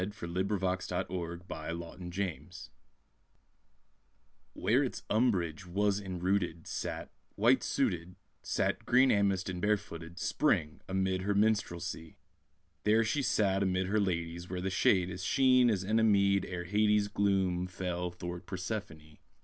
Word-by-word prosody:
From 85 -5 -7
"Sister 100 +3 0
Songs" 90 -1 -2
A 85 -2 -4
CHILD'S 85 +1 -8
KISS 90 -3 -4 1.8
Where - - +2
its - - -4
umbrage[A] 95 -7 +1
was 100 +3 +1
enrooted, 90 -2 -1
Sat, - - -4 0.2
white - - +4
suited, 90 +1 -1 0.3
Sat, - - -1
green 130 +2 +5
amiced 100 -3 +2
and 90 -2 -4
bare 105 +1 +3
footed, 85 -1 -10
Spring, 85 - 0
amid 95 0 0
her 100 +1 0
minstrelsy; 95 -6 -1 0.7
There 110 +2 +4
she 125 +6 0
sat 100 -6 +2
amid 95 -1 +1
her 105 +3 +1
ladies, 85 -2 -2
Where 90 0 -3
the 95 +1 -2
shade 90 -1 +3
is 90 0 -6
Sheen 130 +1 +4
as 100 -4 0
Enna 110 +4 +2
mead 100 -2 +3
ere 90 -1 -4
Hades' 105 +2 +2
Gloom 95 -3 +1
fell 90 -1 -3
thwart 90 +1 -7
Persephone. 90 -6 -6
95 Hz, 135 wpm, -31 LUFS, 90-100 Hz, 1.8 s, green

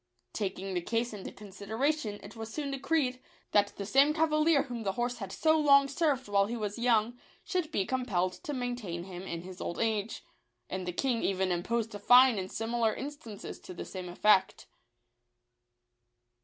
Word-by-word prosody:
Taking 195 -2 -3
the 175 - 0
case 230 +5 -1
into 200 -2 -7
considera 210 +8 -2
tion, 215 -9 -6
it 205 - -11
was 225 0 -7
soon 285 0 -3
decreed, 270 -2 0 0.3
that 205 -1 +4
the 200 - -4
same 275 +7 +4
cavalier 310 -1 +3
whom 245 -3 -6
the 195 -3 -1
horse 245 +3 -2
had 195 -3 -6
so 315 +6 +3
long 280 -2 +6
served 275 -3 0
while 200 -1 +3
he 235 +2 -3
was 210 0 -4
young, 235 0 +2 0.2
should 355 -4 -2
be 195 -9 0
compelled 195 -9 0
to - - -4
maintain 245 -10 -3
him 180 -1 -8
in 170 -3 -5
his 185 0 -9
old 170 - -4
age; 220 -1 -1 0.5
and 185 -1 -3
the - - 0
king 240 +5 0
even 190 -1 0
imposed 225 +6 -1
a 205 - -6
fine 245 +1 +6
in 185 0 -4
similar 225 0 0
instances 270 -7 -7
to 180 - -10
the - - -6
same 185 -2 -7
effect. 190 +1 +3
225 Hz, 180 wpm, -30 LUFS, 195-260 Hz, 0.5 s, long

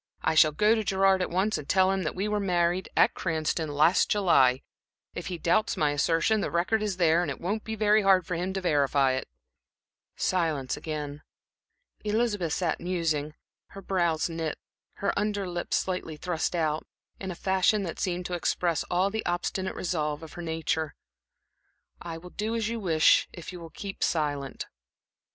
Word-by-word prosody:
I 160 - +2
shall 155 0 +6
go 210 +8 +3
to 220 -1 0
Gerard 195 -1 +3
at 180 - -1
once 190 +5 0
and 145 - -10
tell 190 0 +4
him 195 0 0
that 160 - -3
we 195 +3 -1
were 210 0 0
married 180 -1 +1
at - - +5
Cranston, 160 -1 -1
last 155 +5 +3
July. 135 -11 +4 0.5
If - - -6
he 180 - -4
doubts 170 +6 +1
my 150 -1 +2
assertion, 165 +8 +2
the - - -1
record 180 +6 +1
is 205 -3 -2
there, 170 -1 +4
and 175 - -2
it 140 - -5
won't 205 +5 -2
be 220 - -4
very 215 0 +4
hard 190 -3 +4
for 180 - -4
him 180 +3 -2
to 195 - -2
verify 140 -5 +2
it." 130 0 -3 0.9
Silence 160 -8 0
again. 150 -1 -5 0.8
Elizabeth 210 -6 0
sat 175 -4 -1
musing, 160 -4 -1 0.4
her 195 - -7
brows 170 -4 +1
knit, 165 -2 -3 0.4
her 200 - -1
under 205 -1 -1
lip 175 -1 -5
slightly 180 -4 -1
thrust 175 +1 -2
out, 155 -2 0 0.4
in 190 - -5
a 180 - -4
fashion 190 +3 +2
that 170 - -5
seemed 180 -1 -2
to 180 - -4
express 175 -1 0
all 185 +3 +1
the 220 +1 -2
obstinate 180 +2 -2
resolve 155 -4 -2
of 160 - -10
her 175 - -7
nature. 160 -2 -2 1.1
"I 165 -1 -6
will 180 +2 -11
do 220 +2 -2
as 225 -1 -1
you 230 0 -3
wish, 165 -6 +4
if 175 0 -9
you 180 - -7
will 165 -1 -9
keep 195 +4 -6
silent." 145 -4 -1
175 Hz, 180 wpm, -27 LUFS, 160-195 Hz, 1.1 s, shall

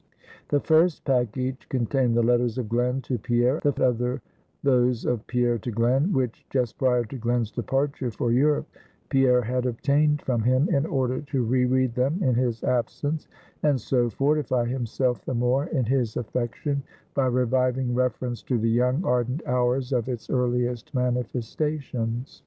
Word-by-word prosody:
The 145 - +3
first 160 +2 +2
package 130 0 -1
contained 125 -1 +1
the 120 - +3
letters 120 0 +2
of 125 -4 -2
Glen 125 +3 0
to 125 -1 -2
Pierre, 120 +5 +1
the 145 -1 +1
other 125 +2 -1 0.4
those 125 -3 +2
of 120 -2 -1
Pierre 120 -2 +1
to 120 - -5
Glen, 125 - +1
which, 130 -8 -1
just 125 -4 -1
prior 125 -2 +3
to 130 +5 -7
Glen's 120 -2 -1
departure 135 +1 -1
for 115 +1 -2
Europe, 145 +5 +2 0.4
Pierre 125 -2 +4
had 125 +2 -1
obtained 145 +5 +1
from 120 -3 0
him, 130 +6 +3
in 140 +3 +1
order 130 -3 -1
to 140 -3 -2
re 125 +2 +2
read 130 -1 +1
them 130 +7 0
in 130 - +3
his 120 -2 0
absence, 145 +5 -1 0.3
and 145 -3 +2
so 120 0 +1
fortify 135 -2 +1
himself 125 -2 -1
the 130 - -3
more 125 +5 +1
in 135 -9 0
his 120 -2 0
affection, 125 +4 -2 0.3
by 135 -2 +1
reviving 125 0 +1
reference 125 -1 -1
to 125 - -1
the 115 0 +1
young, 125 +8 +1
ardent 125 +4 0
hours 125 +1 0
of 125 0 0
its 120 -3 -5
earliest 125 -2 0
manifestations. 125 0 -2
125 Hz, 160 wpm, -25 LUFS, 120-135 Hz, 0.4 s, Pierre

